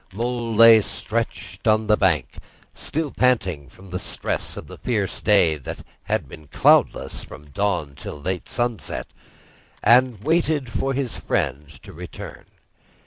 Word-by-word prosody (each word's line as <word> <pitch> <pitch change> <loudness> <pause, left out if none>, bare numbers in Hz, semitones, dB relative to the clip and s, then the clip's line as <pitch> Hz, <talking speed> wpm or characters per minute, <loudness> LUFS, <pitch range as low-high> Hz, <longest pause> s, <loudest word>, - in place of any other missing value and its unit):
Mole 115 +2 -2
lay 115 0 +8
stretched 105 -3 -4
on 110 0 +3
the 105 0 +4
bank, 85 -10 0 0.3
still 155 -2 -2
panting 95 - +1
from 95 +5 -16
the 90 - -2
stress - - -3
of - - -7
the - - -12
fierce 105 -6 -1
day 95 -7 +4
that 70 - -8 0.2
had - - -1
been 75 -1 -12
cloudless 65 - +3
from 75 -1 -12
dawn 90 -6 -1
to - - -7
late 90 +5 -4
sunset, 120 -3 -2 0.8
and 125 -3 +4
waited 155 -5 +1
for 135 +4 -1
his 135 -3 -2
friend 70 +2 -1
to - - -11
return. 85 0 -9
105 Hz, 140 wpm, -23 LUFS, 85-120 Hz, 0.8 s, lay